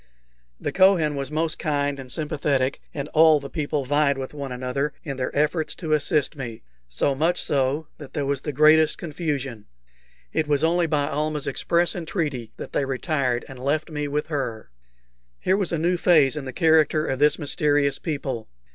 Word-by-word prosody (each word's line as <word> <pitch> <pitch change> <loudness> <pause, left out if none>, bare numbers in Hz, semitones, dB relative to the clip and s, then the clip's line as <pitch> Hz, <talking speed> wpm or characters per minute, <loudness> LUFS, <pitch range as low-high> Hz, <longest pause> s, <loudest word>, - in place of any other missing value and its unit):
The - - -3
Kohen 185 -6 +4
was 140 -1 -3
most 160 +1 -1
kind 145 -2 -1
and 130 -2 -7
sympathetic, 145 -4 0
and 140 -1 -4
all 155 -1 +6
the 140 -1 -9
people 145 -3 -2
vied 145 0 +2
with 135 +1 -6
one 140 -3 -6
another 130 +4 -2
in 140 -4 -4
their 125 - -1
efforts 150 +2 0
to 155 -3 -2
assist 150 0 +1
me 120 -5 -7 0.3
so - - +1
much 165 +6 +1
so 140 +2 0
that 145 -3 -10
there 145 -2 -1
was 140 -1 -1
the 150 - -3
greatest 155 +2 +5
confusion. 145 -8 -4 0.7
It 155 - 0
was 145 0 +1
only 170 +1 +3
by 150 -2 +1
Almah's 150 0 -2
express 170 0 +1
entreaty 150 - -3
that - - -8
they - - +1
retired 135 -2 -1
and 130 -2 -10
left 145 +5 -1
me 150 -1 -2
with 150 +1 -1
her. 130 - -4 0.7
Here 190 - +2
was 195 -3 0
a 165 - 0
new 175 +3 +1
phase 155 -6 +4
in 150 -3 -4
the 130 - -5
character 155 +1 +3
of 130 - -2
this 150 +1 +4
mysterious 145 -2 +1
people. 135 -8 -4
150 Hz, 180 wpm, -24 LUFS, 135-155 Hz, 0.7 s, all